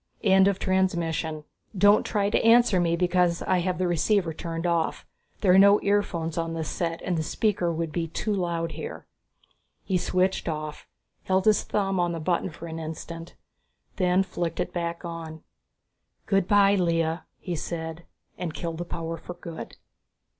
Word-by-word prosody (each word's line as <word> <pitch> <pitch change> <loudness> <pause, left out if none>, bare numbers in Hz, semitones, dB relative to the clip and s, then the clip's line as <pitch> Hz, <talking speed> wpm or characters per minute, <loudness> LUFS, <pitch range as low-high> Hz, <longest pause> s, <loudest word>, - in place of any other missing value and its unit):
End 190 -1 +5
of 200 -1 +2
transmission. 170 -5 0 0.3
Don't 205 +2 +6
try 205 -2 0
to - - +2
answer 230 -4 +5
me 170 -1 +2
because 180 -1 +2
I 185 - +2
have 180 0 -1
the 185 0 0
receiver 175 +1 +1
turned 165 +1 -5
off. 170 -2 0 0.4
There 185 -3 +5
are 190 - +7
no 200 +1 +7
earphones 170 -5 0
on 165 0 -2
this 160 -2 -3
set 165 -1 -3
and 180 - -1
the 160 - 0
speaker 180 +1 0
would 165 -1 -3
be 165 +1 -2
too 210 +6 -2
loud 170 -3 -1
here." 160 +1 -7 0.8
He 185 -2 0
switched 185 0 0
off, 155 -1 -5 0.4
held 190 0 +1
his 215 -1 +5
thumb 195 -2 -1
on 175 -1 +1
the 165 - -4
button 175 +3 0
for 165 0 -10
an 165 -1 -6
instant, 165 +1 -7 0.6
then 185 0 +3
flicked 175 -3 -4
it - - -2
back 170 0 -3
on. 165 -2 -7 0.8
"Good 195 -2 +2
by 200 -1 +5
Lea," 165 -3 +1 0.2
he 175 - -4
said, 160 +1 -5 0.3
and 170 -3 -4
killed 165 -1 -4
the 175 - -3
power 165 -1 -4
for 175 +2 -9
good. 170 -2 -8
175 Hz, 170 wpm, -26 LUFS, 165-190 Hz, 0.8 s, are